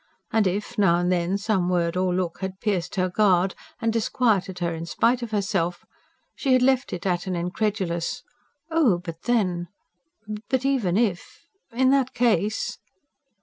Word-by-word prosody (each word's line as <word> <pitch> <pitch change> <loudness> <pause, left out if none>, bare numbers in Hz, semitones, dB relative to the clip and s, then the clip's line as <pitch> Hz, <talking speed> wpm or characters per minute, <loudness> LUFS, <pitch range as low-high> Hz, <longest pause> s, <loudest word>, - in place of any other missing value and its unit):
And 220 -3 +3
if, 210 +5 -3
now 180 -4 +5
and 175 +1 +1
then, 180 +2 +1
some 195 -3 0
word 170 -1 +1
or 185 0 +1
look 180 -2 -2
had 190 0 -5
pierced 200 -6 -1
her 185 -1 +1
guard 190 -1 +3 0.3
and 225 0 0
disquieted 215 -4 +1
her 170 -1 -1
in 165 +1 -6
spite 240 +7 +2
of 235 - -4
herself, 190 -4 -1 0.5
she 270 -3 +1
had 255 -1 +4
left 265 0 +2
it 180 0 -5
at 180 -1 0
an 185 - -1
incredulous: 180 +4 -2 0.5
"Oh, 295 - +4
but 170 -2 -8
then... 185 -8 +1 0.8
But 260 -1 0
even 235 -10 +1
if... 210 -6 -1 0.3
In 260 +3 +3
that 270 -2 +1
case...." 225 -3 +1
195 Hz, 160 wpm, -24 LUFS, 175-230 Hz, 0.8 s, now